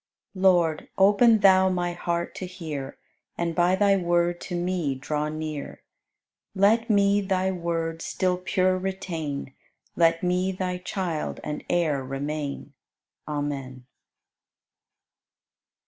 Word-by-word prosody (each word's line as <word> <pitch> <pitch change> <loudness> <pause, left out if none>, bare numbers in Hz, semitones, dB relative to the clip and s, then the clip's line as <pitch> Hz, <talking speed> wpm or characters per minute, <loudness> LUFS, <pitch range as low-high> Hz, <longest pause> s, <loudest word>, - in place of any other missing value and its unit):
84. 185 - -7
Lord, 175 -5 +3
open 210 +4 +5
Thou 190 -1 +6
my 175 -1 -1
heart 170 0 -2
to 185 - -6
hear 155 -7 -6 0.4
And 170 -1 -1
by 175 +2 +3
Thy 200 0 +4
Word 175 -1 +1
to 180 - -5
me 175 -5 -1
draw 150 +3 -2
near; 155 -2 -6 0.7
Let 220 +5 +3
me 200 -1 +4
Thy 190 -1 0
Word 165 -2 -3
still 185 -1 0
pure 185 0 +1
retain, 165 -8 -4 0.4
Let 165 0 +3
me 180 +1 +1
Thy 180 -1 -3
child 180 -4 -3
and 150 0 -4
heir 155 -6 +1
remain. 140 +1 -4 0.5
Amen. 140 -4 -4
175 Hz, 115 wpm, -25 LUFS, 155-185 Hz, 0.7 s, Thou